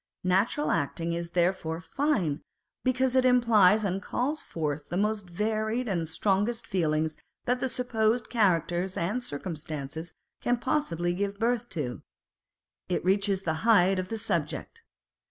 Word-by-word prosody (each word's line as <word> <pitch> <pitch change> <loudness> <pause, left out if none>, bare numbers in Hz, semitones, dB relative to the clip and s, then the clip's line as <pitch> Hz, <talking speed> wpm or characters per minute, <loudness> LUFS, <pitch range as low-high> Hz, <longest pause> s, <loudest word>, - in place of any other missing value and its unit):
Natural 195 +11 +2
acting 165 +4 -1
is 170 0 -3
therefore 170 -2 +1
fine, 180 - 0 0.4
because 255 0 +2
it 260 - +5
implies 220 -5 +5
and 195 0 -1
calls 285 +9 -1
forth 150 -2 -3
the 175 - -2
most 210 -2 0
varied 220 +5 -1
and 170 -5 -1
strongest 205 +7 0
feelings 160 -5 0 0.3
that 250 +1 +1
the 260 - -1
supposed 230 -2 0
characters 185 -4 +1
and 200 +9 -1
circumstances 155 - -5 0.3
can 245 0 +2
possibly 175 - 0
give 200 +2 -2
birth 235 +1 0
to: 135 -8 -4 0.9
it 180 - -1
reaches 195 0 +2
the 160 - 0
height 195 -4 +5
of 185 - -3
the 225 - -2
subject. 455 - -2
195 Hz, 135 wpm, -28 LUFS, 170-235 Hz, 0.9 s, it